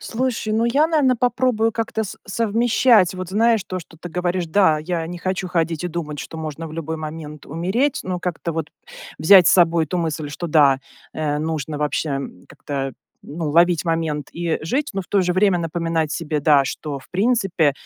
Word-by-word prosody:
Слушай, 235 -2 -2
ну 220 +2 +2
я, 285 +6 +3
наверно, 290 -6 +2
попробую 240 -2 +1
как-то 225 -1 -2
с 200 - -8
совмещать. 225 -1 +3
Вот 185 -1 -6
знаешь, 225 +1 +2
то, 185 - -4
что 165 -1 -13
ты 175 - -8
говоришь, 180 0 -1
да, 160 -2 +3
я 165 +1 -3
не 175 +2 -6
хочу 185 +1 -2
ходить 165 -1 -1
и - - -1
думать, 155 -3 -5
что 160 - -7
можно 160 +1 -5
в 155 - -11
любой 160 0 -4
момент 155 -1 -8
умереть. 190 - 0
Но 180 -1 -3
как-то 170 -1 -3
вот 160 -1 -4 0.5
взять 180 +1 +7
с - - +5
собой 170 -2 +4
эту 180 +4 -3
мысль, 160 -3 -2
что 160 +4 -5
да, 145 -4 +4 0.3
э, 150 -2 -1
нужно 155 -1 -3
вообще, 150 +1 -1
м, 135 -10 -5
как-то, 135 -2 -5 0.3
ну, 155 +1 -5
ловить 170 +2 +3
момент 160 -3 -1
и 170 -1 -2
жить, 275 - -1
но 195 - -2
в 180 - -9
то 200 -2 +2
же 180 0 +1
время 190 -1 +3
напоминать 165 -1 -1
себе, 155 -2 -2
да, 145 -1 +4
что 145 0 -5
в - - -18
принципе 195 - +2
170 Hz, 195 wpm, -21 LUFS, 155-200 Hz, 0.5 s, взять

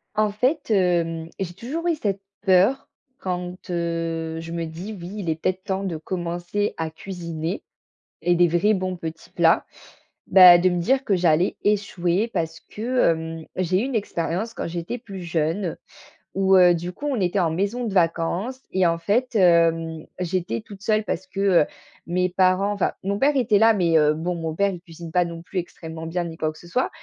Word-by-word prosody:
En 215 -1 +2
fait, 255 +5 0
hem, 170 -4 +1
j'ai 175 -2 -3
toujours 280 - -4
eu 335 - +2
cette 200 -8 -2 0.2
peur 195 +8 +4 0.3
quand, 180 -1 -4
heu, 165 -1 -2
je 165 0 -7
me 170 0 -2
dis: 170 +7 -7
«Oui, 175 +2 -7
il 190 -5 -3
est 160 - +1
peut-être 185 0 -1
temps 190 0 -2
de 180 -5 -3
commencer 175 +4 -3
à 160 -1 -2
cuisiner 170 0 -5 0.6
et 175 - +3
des 175 0 +4
vrais 175 +6 +3
bons 185 -1 -2
petits 160 -1 -8
plats», - - +3 0.6
bah, 180 -2 +9
de 180 +2 +3
me 175 -1 -1
dire 265 +8 +2
que 205 - +1
j'allais 175 0 +2
échouer 200 0 +1
parce 160 0 -2
que, 245 -1 +1
hem, 160 0 -5
j'ai 185 0 +1
eu - - -1
une 270 -2 -3
expérience 195 +1 -2
quand - - -4
j'étais 170 +7 -4
plus 200 -6 -9
jeune 165 +2 -1 0.6
où, 190 0 +4
heu, 180 -1 +7
du 175 +2 -4
coup 290 - -5
on 270 -5 0
était 185 +1 +1
en 170 -3 +2
maison 205 +8 -1
de 215 - -3
vacances 180 +8 0
et 190 -1 +2
en 165 0 +1
fait, 235 +8 0
hem, 165 -4 +3
j'étais 175 - -2
toute 200 - -13
seule 215 0 +2
parce 190 -3 -3
que, 195 +1 -7 0.2
heu, - - -5 0.4
mes 180 +1 +1
parents 185 +2 +2
enfin 200 - 0
mon 200 +1 -1
père 290 +2 +3
était 220 -6 +3
là, 225 +1 +6
mais, 170 -5 +3
heu, 150 -1 +4
bon, 170 +3 -2
mon 165 -2 -4
père 200 +3 +2
il 180 - -7
cuisine 170 -2 -10
pas 180 +1 +3
non 170 -1 -7
plus 180 +3 -8
extrêmement 160 -2 -7
bien 175 +2 -2
ni 165 -1 -7
quoi 155 -1 -1
que - - -17
ce 175 - -14
soit 250 +9 0
180 Hz, 200 wpm, -23 LUFS, 165-200 Hz, 0.6 s, bah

